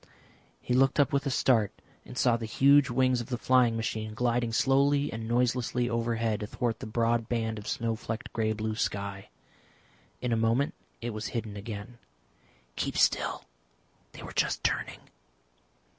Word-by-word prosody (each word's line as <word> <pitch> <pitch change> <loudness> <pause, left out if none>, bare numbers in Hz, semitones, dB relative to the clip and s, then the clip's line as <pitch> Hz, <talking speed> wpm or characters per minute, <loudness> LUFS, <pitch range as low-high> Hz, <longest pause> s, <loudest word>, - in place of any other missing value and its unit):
He 125 - -2
looked 135 +3 +3
up 145 +1 +3
with 140 +1 +1
a - - +1
start 115 -5 +2 0.3
and 125 - -10
saw 125 -2 +3
the 115 -1 -4
huge 140 +4 +5
wings 130 0 +2
of 120 - -8
the 125 - -1
flying 125 -2 +3
machine 110 -1 -3
gliding 120 0 0
slowly 140 +3 +2
and 110 0 -5
noiselessly 120 0 +1
overhead 115 -2 0
athwart 115 +2 -2
the - - -6
broad 115 +1 0
band 110 -2 -1
of 105 - -10
snow 115 -1 -1
flecked 110 0 -6
grey 110 -1 0
blue 110 0 -3
sky. 100 -3 -3 0.9
In 125 -1 -1
a - - +3
moment 115 +5 +1 0.3
it 120 0 -3
was 110 0 -4
hidden 110 -4 -4
again. 105 +3 -7 0.8
"Keep - - -2
still; - - +2 0.7
they - - -10
were - - -8
just - - 0
turning." - - -1
115 Hz, 160 wpm, -29 LUFS, 110-125 Hz, 0.9 s, huge